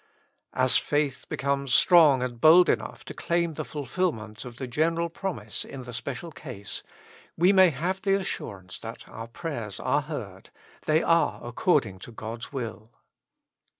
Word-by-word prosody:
As 130 -1 +4
faith 145 -3 -1
becomes 140 -1 0
strong 155 -8 +6
and 120 -2 -5
bold 170 +3 +8
enough - - -1
to - - -7
claim 170 -1 0
the - - -4
fulfilment 135 -7 -3
of 120 -1 -9
the 130 - -4
general 165 +6 0
promise 155 - -4
in 135 -2 -8
the 120 0 -9
special 140 +8 -5
case, 125 -10 -7 0.6
we 180 +4 +5
may 190 -2 +7
have 175 +7 -2
the 195 0 +3
assur 175 - -3
ance 95 0 -11
that 115 0 -8
our 115 +1 -8
prayers 115 - -5
are 150 - +1
heard: 115 - -7 0.4
they 155 +1 +3
are 165 0 +2
according 120 - +1
to 120 - -10
God's 115 +1 -7
will. 115 -5 -5
140 Hz, 155 wpm, -27 LUFS, 115-165 Hz, 0.6 s, bold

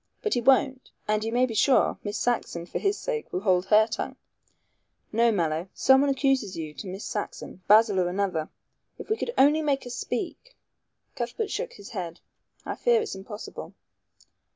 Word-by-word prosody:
But 430 - +1
he 245 - +1
won't, 265 +1 +3 0.2
and 215 0 +1
you 225 - -2
may 245 +2 +3
be 240 - -5
sure 255 +5 +3
Miss 205 +1 -3
Saxon, 220 -8 -1
for - - -4
his 400 0 +1
sake, 470 -3 -4
will 180 - -2
hold 185 -2 +2
her 215 0 +6
tongue. 220 - -4 1.0
No, 230 +2 +3
Mallow. 165 -2 -1
Someone 265 +2 +5
accuses 270 -8 +1
you 155 -2 -5
to 195 - -8
Miss 190 +3 -6
Saxon 205 -3 -5
Basil 210 -1 +6
or 180 - +2
another. 180 -4 -1 0.5
If - - -8
we - - +4
could 460 - -3
only 295 +3 +5
make 285 -3 0
her 245 - -8
speak - - -5 0.3
" - - -49
Cuthbert 245 - -3
shook - - -3
his 205 -1 -12
head. 175 -6 -5 0.5
"I - - -3
fear 480 -1 +3
it's 440 -1 -3
impossible." 205 +2 -8
225 Hz, 180 wpm, -26 LUFS, 190-275 Hz, 1.0 s, her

